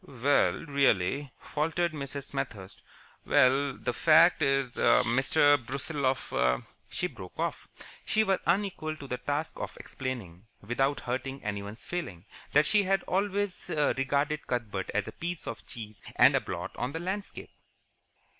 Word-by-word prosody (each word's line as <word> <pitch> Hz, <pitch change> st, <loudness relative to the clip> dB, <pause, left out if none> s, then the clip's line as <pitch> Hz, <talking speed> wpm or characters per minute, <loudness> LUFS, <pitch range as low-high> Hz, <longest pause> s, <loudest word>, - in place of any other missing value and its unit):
"Well, 140 Hz, +2 st, +2 dB
really," 140 Hz, -, +1 dB
faltered 165 Hz, +2 st, -1 dB
Mrs. 140 Hz, -1 st, -6 dB
Smethurst. 100 Hz, -2 st, -5 dB, 0.4 s
"Well, 135 Hz, +2 st, +3 dB
the -, -, -2 dB
fact -, -, +5 dB
is, 135 Hz, -2 st, +1 dB
Mr. 135 Hz, +4 st, +4 dB
Brusiloff 130 Hz, -, 0 dB, 0.2 s
" -, -, -39 dB
She -, -, -2 dB
broke -, -, -8 dB
off. -, -, -3 dB, 0.4 s
She 220 Hz, -, +2 dB
was 195 Hz, -3 st, +1 dB
unequal 175 Hz, -4 st, 0 dB
to 145 Hz, -, -10 dB
the 125 Hz, -2 st, -4 dB
task 145 Hz, +5 st, -3 dB
of -, -, -5 dB
explaining, 110 Hz, -8 st, -6 dB
without 135 Hz, +6 st, 0 dB
hurting 135 Hz, +2 st, -4 dB
anyone's 100 Hz, +1 st, -5 dB
feelings, 100 Hz, -, -5 dB, 0.3 s
that 150 Hz, +1 st, +5 dB
she 210 Hz, +3 st, +5 dB
had 195 Hz, -1 st, +1 dB
always 200 Hz, 0 st, -1 dB
regarded 145 Hz, 0 st, 0 dB
Cuthbert 105 Hz, -6 st, -2 dB
as 105 Hz, 0 st, -1 dB
a -, -, -5 dB
piece 170 Hz, +7 st, -4 dB
of 115 Hz, -, -7 dB
cheese 105 Hz, -3 st, -8 dB
and -, -, +7 dB
a -, -, +2 dB
blot -, -, -5 dB
on 125 Hz, +3 st, -2 dB
the 165 Hz, -, -3 dB
landscape. 190 Hz, +4 st, -5 dB
135 Hz, 145 wpm, -29 LUFS, 120-155 Hz, 0.4 s, and